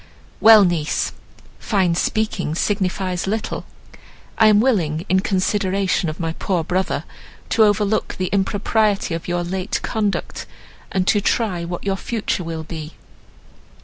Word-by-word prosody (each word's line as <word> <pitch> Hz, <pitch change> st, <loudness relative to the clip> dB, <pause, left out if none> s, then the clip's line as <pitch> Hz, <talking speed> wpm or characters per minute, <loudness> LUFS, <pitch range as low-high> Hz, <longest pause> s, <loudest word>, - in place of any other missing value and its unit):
"Well! 220 Hz, -2 st, +8 dB
niece, 165 Hz, -4 st, 0 dB, 0.5 s
fine 190 Hz, -5 st, +1 dB
speaking 180 Hz, -3 st, -1 dB
signifies 185 Hz, -1 st, -1 dB
little. 215 Hz, +2 st, -3 dB, 0.7 s
I 220 Hz, -, +5 dB
am 210 Hz, -1 st, +6 dB
willing, 175 Hz, -10 st, +1 dB
in 190 Hz, +1 st, +4 dB
consideration 190 Hz, -1 st, 0 dB
of 155 Hz, -, -7 dB
my 165 Hz, -1 st, -2 dB
poor 175 Hz, -1 st, -1 dB
brother, 185 Hz, +3 st, -1 dB, 0.5 s
to 225 Hz, -, +4 dB
overlook 210 Hz, 0 st, +1 dB
the 185 Hz, -1 st, -2 dB
impropriety 205 Hz, 0 st, +1 dB
of 165 Hz, -, -5 dB
your 175 Hz, 0 st, -1 dB
late 185 Hz, +2 st, -2 dB
conduct, 210 Hz, -3 st, -2 dB, 0.4 s
and 185 Hz, -1 st, 0 dB
to 205 Hz, -, +3 dB
try 195 Hz, -6 st, 0 dB
what 175 Hz, 0 st, -5 dB
your 195 Hz, -1 st, -1 dB
future 215 Hz, -3 st, -2 dB
will 165 Hz, -1 st, -5 dB
be." 160 Hz, -1 st, -8 dB
190 Hz, 135 wpm, -20 LUFS, 175-210 Hz, 0.7 s, Well